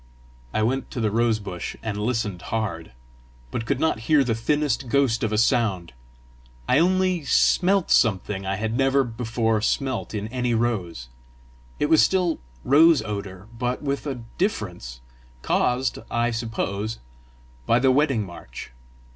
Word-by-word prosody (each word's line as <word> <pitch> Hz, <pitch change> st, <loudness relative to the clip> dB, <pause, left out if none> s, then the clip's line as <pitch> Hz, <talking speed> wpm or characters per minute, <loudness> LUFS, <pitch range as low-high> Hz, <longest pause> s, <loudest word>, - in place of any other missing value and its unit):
I 110 Hz, -, 0 dB
went 130 Hz, +4 st, -1 dB
to -, -, -6 dB
the 110 Hz, -2 st, 0 dB
rose 115 Hz, 0 st, +2 dB
bush 95 Hz, -4 st, -6 dB
and 110 Hz, -2 st, -3 dB
listened 105 Hz, -4 st, -2 dB
hard, 110 Hz, -7 st, -3 dB, 0.6 s
but 115 Hz, -, -4 dB
could 135 Hz, +1 st, 0 dB
not 160 Hz, -7 st, +1 dB
hear 150 Hz, -3 st, +5 dB
the 120 Hz, -3 st, 0 dB
thinnest 140 Hz, +3 st, -1 dB
ghost 130 Hz, -4 st, +2 dB
of 110 Hz, -, 0 dB
a 105 Hz, -, 0 dB
sound; 100 Hz, -, +1 dB, 0.7 s
I 130 Hz, +3 st, +4 dB
only 185 Hz, -1 st, +2 dB
smelt 185 Hz, +6 st, +3 dB
something 100 Hz, -3 st, +2 dB
I 95 Hz, 0 st, -2 dB
had 110 Hz, +3 st, -2 dB
never 135 Hz, +1 st, +3 dB
before 115 Hz, -2 st, -1 dB
smelt 130 Hz, -1 st, -1 dB
in 105 Hz, 0 st, -3 dB
any 125 Hz, -1 st, -1 dB
rose. 95 Hz, -, -2 dB, 0.7 s
It -, -, +1 dB
was 160 Hz, +1 st, +5 dB
still 180 Hz, -3 st, +2 dB, 0.2 s
rose 155 Hz, 0 st, +5 dB
odour, 100 Hz, -2 st, -6 dB
but 125 Hz, +3 st, -2 dB
with 140 Hz, +1 st, -2 dB
a 130 Hz, -4 st, -4 dB, 0.2 s
difference, 90 Hz, -, -3 dB, 0.4 s
caused, 125 Hz, +2 st, 0 dB
I 120 Hz, 0 st, 0 dB
suppose, 115 Hz, -2 st, -3 dB, 0.7 s
by 115 Hz, -, +4 dB
the 130 Hz, +1 st, +4 dB
Wedding 135 Hz, -6 st, +2 dB
March. 85 Hz, -7 st, -10 dB
115 Hz, 145 wpm, -24 LUFS, 105-135 Hz, 0.7 s, hear